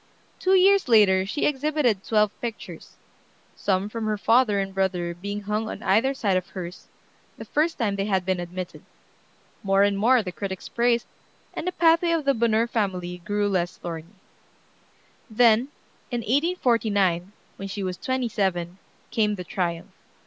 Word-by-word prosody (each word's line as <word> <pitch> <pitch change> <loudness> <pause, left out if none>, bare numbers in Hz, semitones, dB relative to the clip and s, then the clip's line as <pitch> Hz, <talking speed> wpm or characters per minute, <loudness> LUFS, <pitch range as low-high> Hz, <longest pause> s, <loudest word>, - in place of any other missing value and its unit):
Two 375 +1 +3
years 390 0 +5
later 195 -5 +5
she 290 - -1
exhibited 285 -7 +1
twelve 210 -2 +2
pictures, 235 -2 -7 0.6
some 190 0 0
from 220 0 -4
her 215 -1 0
father 225 0 +3
and 195 0 -3
brother 180 -3 -1
being 200 +4 -5
hung 210 +2 -2
on - - -7
either 230 +8 +2
side 205 -7 0
of 185 - -3
hers, 180 -1 -8 0.5
the - - -8
first 320 +3 0
time 210 -5 0
they 195 0 -1
had 190 -3 0
been 185 -1 0
admitted. 175 +1 -6 0.8
More 195 -2 +3
and 200 0 +2
more 235 +4 +3
the 180 - -5
critics 190 0 -6
praised, 235 0 +1 0.5
and 335 - -5
the - - +1
pathway 335 0 +3
of 320 -3 -1
the 275 - +4
Bonheur 230 -1 +2
family 185 -6 -2
grew 205 +4 -1
less 180 -2 -1
thorny. 170 +3 -7 1.1
Then, 230 +2 +4 0.4
in 240 -2 -2
1849, 225 - +1 0.3
when 195 - -6
she 200 +1 -5
was 185 -1 -3
twenty 260 -1 -1
seven, 190 -4 -2 0.3
came 210 -2 +1
the 180 - -6
triumph. 170 -2 -3
205 Hz, 160 wpm, -25 LUFS, 190-240 Hz, 1.1 s, years